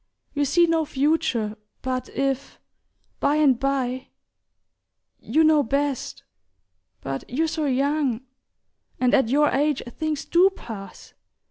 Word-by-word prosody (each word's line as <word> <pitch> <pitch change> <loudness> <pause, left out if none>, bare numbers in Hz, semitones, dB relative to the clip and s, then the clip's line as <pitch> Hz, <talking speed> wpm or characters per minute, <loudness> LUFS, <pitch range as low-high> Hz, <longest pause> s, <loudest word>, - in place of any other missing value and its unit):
you 290 0 +1
see 345 +5 +4
no 330 -1 +1
future; 280 -7 0 0.3
but 255 -1 -2
if, 275 0 -2 0.6
by 290 - +2
and 280 -5 +4
bye... 265 -1 -1 1.1
you 310 +8 +2
know 310 -1 +5
best... 280 +1 -2 0.8
but 135 0 -4
you're 300 +7 0
so 315 -1 -2
young... 275 -2 +1 0.8
and 250 -1 +2
at 265 -5 +4
your 295 +3 +4
age 290 0 +1 0.2
things 310 -2 -2
DO 360 +3 +5
pass. 200 - -10
275 Hz, 120 wpm, -24 LUFS, 255-305 Hz, 1.1 s, know